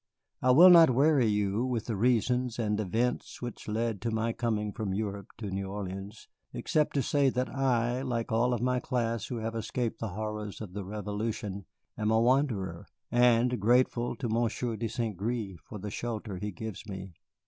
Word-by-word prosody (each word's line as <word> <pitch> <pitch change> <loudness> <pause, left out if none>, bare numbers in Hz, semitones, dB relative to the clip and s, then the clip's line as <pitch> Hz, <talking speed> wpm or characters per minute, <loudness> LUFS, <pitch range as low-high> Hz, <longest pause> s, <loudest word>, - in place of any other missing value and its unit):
I 130 - +2
will 170 +8 +9
not 165 -3 +9
weary 135 0 +4
you 105 +1 +1
with 125 -4 -1
the 115 - -2
reasons 125 +2 +1
and 105 -3 0
events 115 +5 -1
which 120 -2 -7
led 110 -1 -1
to 115 - -1
my 115 +1 0
coming 105 -4 -1
from 105 -5 -3
Europe 100 -2 -3
to 105 -4 -5
New 95 0 -3
Orleans, 100 +1 -6 0.3
except 150 -1 0
to 140 - +2
say 140 +2 +3
that 125 0 -1
I, 125 -2 +1
like 120 -4 -2
all 115 +3 +2
of 120 -1 -1
my 125 0 +2
class 115 -4 -1
who 125 - -4
have 115 0 -3
escaped 115 +1 -2
the 115 - -2
horrors 105 -1 -4
of 105 -5 -8
the 100 0 -4
Revolution, 105 0 -4 0.3
am 105 0 +1
a 110 0 +4
wanderer, 120 -5 +1 0.2
and 120 0 +4
grateful 120 +2 +2
to 120 +1 -3
Monsieur 115 +1 0
de 115 +2 -2
St. 110 -1 -3
Gré 105 -1 -3
for 105 - -10
the 105 +1 -6
shelter 110 -4 -4
he 105 +3 -3
gives 110 +1 -7
me. 95 -2 -7
115 Hz, 185 wpm, -30 LUFS, 105-125 Hz, 0.3 s, will